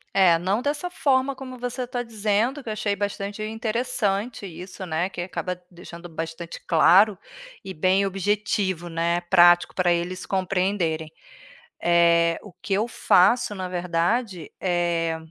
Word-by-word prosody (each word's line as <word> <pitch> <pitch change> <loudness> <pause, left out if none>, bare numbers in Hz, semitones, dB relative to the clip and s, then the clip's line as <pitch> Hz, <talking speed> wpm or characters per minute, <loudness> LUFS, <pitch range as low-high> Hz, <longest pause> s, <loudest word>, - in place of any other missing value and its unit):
É, 180 -4 +5
não 195 +7 -1
dessa 295 +5 -2
forma 275 -4 +1
como 260 -1 -9
você 245 +1 -4
está 245 0 -4
dizendo, 225 +4 -1
que 230 - -7
eu 215 - -2
achei 205 -1 -1
bastante 200 0 -4
interessante 220 -1 -2
isso, 185 +1 -8
né, 170 +2 -1
que 180 - -6
acaba 180 0 -4
deixando 175 0 -11
bastante 165 +1 -7
claro, 185 +5 +5 0.5
e 190 - -6
bem 185 +5 +2
objetivo, 195 -2 -1
né, 170 +1 0
prático 175 0 +5
para 180 -1 +2
eles 175 +2 -2
compreenderem. 180 -4 -1 0.7
Eh, 170 -1 +4
o 205 - -12
que 195 - -3
eu 215 +4 +1
faço 210 +1 +3
na 185 -1 -5
verdade 180 +2 -1
eh, 170 -2 0
190 Hz, 140 wpm, -24 LUFS, 175-215 Hz, 0.7 s, É